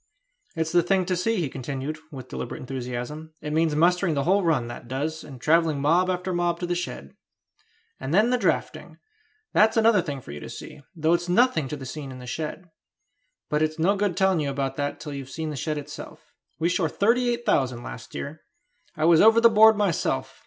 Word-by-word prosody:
"It's 160 -1 -1
the 175 0 +5
thing 185 +2 +1
to 185 0 0
see," 225 +6 0
he 175 -7 0
continued, 135 +3 -5
with 130 -4 -9
deliberate - - -5
enthusiasm: 130 +5 -6
"it 150 -1 -5
means 160 -1 +2
mustering 175 +1 +3
the 140 - 0
whole 195 +5 +3
run, 150 -8 +1
that 120 0 -9
does, 150 +5 -3
and 135 -4 -11
travelling 160 +1 +2
mob 170 +6 +3
after 180 0 -2
mob 175 -1 0
to - - -1
the 175 - -1
shed; 125 - -5 0.8
and 135 +1 -5
then 215 +8 +4
the 250 - +3
drafting; - - -2 0.6
that's 220 +2 +4
another 225 -3 +5
thing 145 -5 -5
for 95 - -11
you 75 - -7
to - - -9
see, - - -9
though 160 0 +2
it's 175 +1 0
nothing 180 - +3
to 150 - -5
the 135 - -8
scene 135 +1 -7
in 130 - -9
the 125 - -10
shed. 155 +8 -5 0.8
But 150 0 0
it's 155 +1 0
no 180 +5 +2
good 200 -3 -1
telling 190 -3 +3
you 145 -2 -1
about 135 -1 -2
that 145 0 -2
till 150 -2 -7
you've 135 -2 -7
seen 160 +2 -4
the - - -5
shed 155 +2 -2
itself. 145 0 -9 0.3
We 165 - +2
shore 175 -2 +1
thirty 240 +7 +2
eight 240 0 -2
thousand 125 -4 +1
last 115 - -9
year. 155 +2 -6 0.5
I 155 -1 0
was 165 -1 +6
over 225 +1 +7
the 235 0 +7
board 220 0 +7
myself. 140 -9 -1
160 Hz, 215 wpm, -25 LUFS, 140-180 Hz, 0.8 s, over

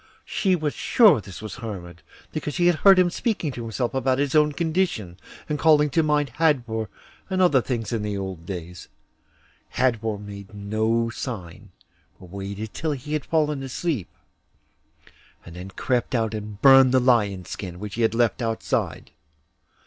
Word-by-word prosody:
She 190 -3 +1
was 155 -4 -2
sure 205 - +5
this 95 +2 -10
was 105 -3 -7
Hermod, 90 -8 -7 0.3
because 150 -1 -4
she 175 -1 +3
heard 190 +3 +6
him 180 -1 +4
speaking 195 - -1
to 125 - -7
himself 115 +2 -3
about 130 -1 +1
his 140 -1 0
own 150 -1 +4
condition, 160 - -1 0.3
and 150 -1 -2
calling 150 -2 +4
to 165 - +3
mind 150 -2 +1
Hadvor 120 -9 +1 0.4
and 190 -1 -1
other 175 -8 +4
things 115 -3 -3
in 115 - -1
the 105 -1 -3
old 95 -4 -5
days. 90 -2 -7 0.9
Hadvor 115 -4 +1
made 100 0 -10
no 110 +3 0
sign, 105 -9 -7 0.5
but 90 -2 -14
waited 100 +2 -6
till 160 -2 -2
he 145 +2 -6
had 150 -3 -2
fallen 150 -3 0
asleep, 135 - -3 1.4
and 85 - -11
then 90 +2 -8
crept 125 +6 -1
out 110 -2 0
and 105 -1 -6
burned 135 -2 +7
the 130 - +5
lion's 105 -7 +1
skin, 90 -3 -6
which 105 0 -6
he 120 - -3
had 115 0 +2
left 120 0 +1
outside. 115 -1 -2
120 Hz, 165 wpm, -24 LUFS, 105-150 Hz, 1.4 s, burned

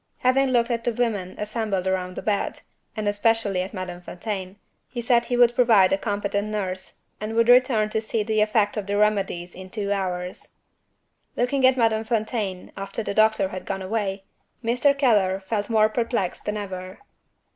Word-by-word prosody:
Having 265 +2 +3
looked 240 -1 +2
at 230 -1 -1
the 240 - +1
women 215 -6 -1
assembled 210 -3 -2
round 185 -1 -1
the - - -6
bed 205 -2 -1 0.4
and 215 -1 -2
especially 205 -2 +1
at 185 - -5
Madame 180 -2 -6
Fontaine 185 +1 -5 0.3
he 245 - -6
said 235 0 +2
he 245 - -1
would 240 -1 +5
provide 225 -7 +5
a - - +3
competent 205 0 -2
nurse, 190 -3 -4 0.2
and 215 +1 -4
would 230 0 +3
return 245 -3 +5
to 220 - 0
see 220 0 -1
the 215 0 +1
effect 215 0 +2
of 205 -2 -3
the 205 0 0
remedies 195 -4 0
in 185 0 -10
two 200 -1 -3
hours. 180 -2 -3 0.8
Looking 255 +2 +3
at 260 0 +3
Madame 225 -2 +2
Fontaine, 220 -4 -2
after 195 +3 -4
the 200 - -3
doctor 215 -2 +3
had 185 -1 -6
gone 195 -1 -3
away, 195 -1 -2 0.4
Mr. 250 +5 +2
Keller 205 -8 +3
felt 205 +2 -3
more 215 -1 +4
perplexed 230 -4 -2
than 210 0 -2
ever. 185 -2 -6
210 Hz, 180 wpm, -24 LUFS, 190-230 Hz, 0.8 s, would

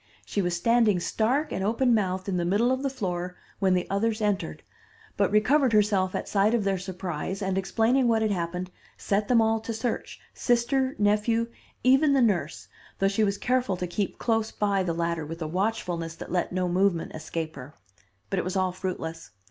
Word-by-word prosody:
She 205 - -1
was 175 -1 0
standing 225 -1 +3
stark 255 - 0
and 190 - -2
open 235 +4 +2
mouthed 190 -3 0
in 190 -2 0
the 175 - 0
middle 205 +8 +2
of 260 0 0
the 275 - 0
floor, 180 -8 -3 0.2
when 190 -2 +3
the 180 - 0
others 215 +3 0
entered, 205 - -1 0.5
but - - +2
recovered 245 +5 +3
herself 200 -3 +2
at - - -3
sight 210 +3 +2
of 225 - +1
their 195 -1 0
surprise, 185 -1 -4
and, 190 -2 -1
explaining 225 +7 +2
what 225 -1 +3
had 215 - +1
happened, 180 0 -3 0.3
set 205 +1 0
them 235 -2 +4
all 225 0 +2
to 225 +1 -5
search, 225 +1 -3
sister, 260 +2 +1
nephew, 215 +3 +2 0.3
even 270 +3 +5
the 275 - +4
nurse, 175 -9 0 0.3
though 195 - +2
she 200 +2 +1
was 200 -1 +1
careful 245 -5 0
to 180 - -2
keep 185 +3 -3
close 225 -2 0
by 200 -2 +1
the 180 -2 -1
latter 170 -1 -1
with 165 +2 -7
a 160 - -3
watchfulness 175 -3 -2
that - - -9
let 180 -1 0
no 180 0 0
movement 180 -1 +1
escape 160 0 -5
her. 140 +3 -10 0.6
But - - +1
it - - -1
was 185 +2 -3
all 185 -1 +1
fruitless. 180 -3 -5
200 Hz, 195 wpm, -27 LUFS, 180-225 Hz, 0.6 s, even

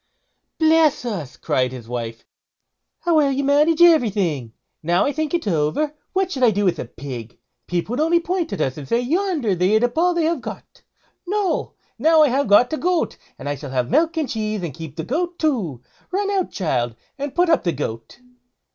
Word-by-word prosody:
"Bless 315 -4 +3
us!" 185 - -5
cried 130 -1 0
his 125 -3 -9
wife, 115 -1 -5 0.8
"how 345 -1 +2
well 285 -2 +4
you 275 +1 -1
manage 300 +4 +4
everything! 200 - +3 0.3
Now 175 +3 +2
I 285 - +1
think 310 0 -2
it 335 - -2
over, 170 - 0 0.2
what 380 -1 0
should 265 - -4
I 245 - +6
do 205 -1 0
with 180 - +1
a - - -3
pig? 120 -2 -8 0.3
People 180 +6 -2
would 250 - -2
only 330 +2 +3
point 345 -4 -2
at 200 - -3
us 130 +1 -1
and 140 - -8
say, 235 - +2
'Yonder 305 - 0
they 185 +4 +2
eat 220 - +3
up 245 0 0
all 355 +1 +3
they 340 - +1
have 335 +1 0
got.' - - -9 0.5
No! 405 0 -1 0.3
now 320 0 +5
I 295 - +4
have 270 +2 +1
got 235 +7 +5
a - - 0
goat, 355 0 0 0.2
and 140 - -8
I 145 - 0
shall 145 0 -8
have 125 -2 -1
milk 325 +1 +2
and 310 -3 0
cheese, 215 -4 -3
and 165 -5 -4
keep 160 -1 -9
the 160 - -4
goat 345 - -2
too. 200 - -1 0.3
Run 400 +2 -1
out, 385 -3 0
child, 120 - -1 0.2
and 280 -1 -4
put 355 +1 +3
up 325 - +3
the 170 - +1
goat." 115 - -6
245 Hz, 210 wpm, -21 LUFS, -, 0.8 s, I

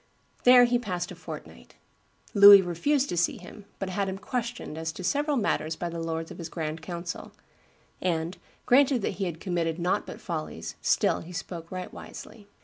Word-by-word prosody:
There 250 0 +9
he 245 0 +3
passed 180 -6 -4
a - - -8
fortnight. - - -10 0.6
Louis 200 -1 +10
refused 260 - +1
to 175 - -2
see 175 - +1
him, 195 +3 -12
but 195 -1 -4
had 195 +1 -1
him 190 - -4
"questioned 235 -3 -4
as 160 0 -3
to 185 - -8
several 290 - +1
matters 160 -8 0
by 175 - -4
the 170 0 -5
lords 165 0 -3
of - - -10
his 165 -1 -6
grand 160 -1 -4
council; 170 +1 -6 0.7
and, 170 0 -1 0.3
granted 260 -2 +4
that 190 - -2
he 195 - 0
had 170 -3 -4
committed 170 -3 -1
nought 180 +1 0
but - - -8
follies, 155 - -5
still - - +2
he 170 - -10
spoke 170 -1 -6
right 185 -1 -6
wisely." 205 -3 -11
180 Hz, 185 wpm, -27 LUFS, 165-210 Hz, 0.7 s, Louis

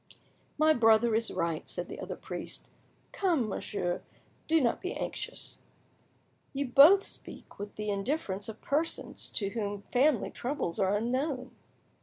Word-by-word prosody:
"My 310 +1 +5
brother 225 -2 +5
is 225 +1 +2
right," 170 -3 -2
said - - -4
the - - -8
other - - -5
priest. - - -7 0.4
"Come, 335 - +1
monsieur; 185 -3 -2 0.5
do 325 0 +4
not 240 -5 +1
be 370 - -3
anxious." - - -5 0.9
"You 275 -1 -2
both 320 +10 +8
speak - - -10
with 205 0 -6
the 210 -1 -2
indifference 200 -1 -2
of 220 - -9
persons 310 +4 -1
to 200 -2 0
whom 205 -2 -3
family 265 -2 +2
troubles 240 - -3
are 195 +1 +3
unknown." 255 +3 -1
235 Hz, 140 wpm, -30 LUFS, 205-290 Hz, 0.9 s, both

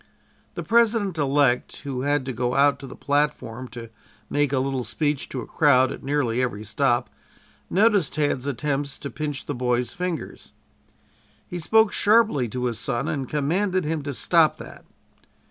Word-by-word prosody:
The - - -4
President 225 -6 +2
elect, 140 -3 +1
who 135 -3 -4
had 145 0 0
to 130 - -3
go 125 +2 -1
out 140 0 +4
to 135 - -9
the - - -10
platform 140 -4 -1
to 115 -2 -10 0.4
make 145 -2 +1
a 140 - +1
little 130 -1 -1
speech 145 +1 -2
to 130 - -4
a - - -7
crowd 130 -4 +3
at - - -7
nearly 135 -4 0
every 115 -5 -2
stop, 120 +3 0 0.6
noticed 200 -6 +2
Tad's 145 -3 0
attempts 140 +1 -2
to 140 - -7
pinch 145 -2 -4
the 145 - -3
boys' 125 -1 -1
fingers. 180 -3 -5 0.9
He 175 - -5
spoke 220 +6 +3
sharply 210 - +3
to 125 +2 -3
his 115 -3 -2
son 120 0 -2
and 135 -3 -3
commanded 180 +6 0
him 155 0 -2
to 140 0 -5
stop 165 +1 +3
that. - - -11
140 Hz, 165 wpm, -24 LUFS, 125-155 Hz, 0.9 s, out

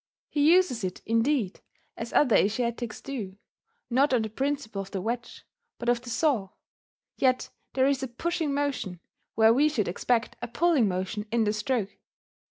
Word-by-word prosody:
He 295 +1 +4
uses 350 - +3
it, 185 -1 -3
indeed, 230 -2 +1 0.4
as 230 +1 -6
other 255 -7 +4
Asiatics 235 +2 0
do, 215 -9 -6 0.5
not 265 +2 +3
on 230 - +2
the 220 - -5
principle 270 -5 -2
of 195 - -9
the 195 - -3
wedge, 235 +4 -4 0.3
but 240 - -2
of 240 -1 +2
the 245 - -9
saw; 225 -5 +1 0.7
yet 255 -1 +1 0.2
there 260 0 +3
is 275 -1 +2
a 265 - -2
pushing 320 +5 -2
motion 275 -11 -2 0.4
where 220 +1 +6
we 290 +5 +4
should 240 -9 -1
expect 230 +6 0
a 245 - -3
pulling 300 -2 +3
motion 190 +3 -3
in 230 -1 +2
the 210 -1 +1
stroke 215 -1 -2
240 Hz, 170 wpm, -27 LUFS, 215-275 Hz, 0.7 s, where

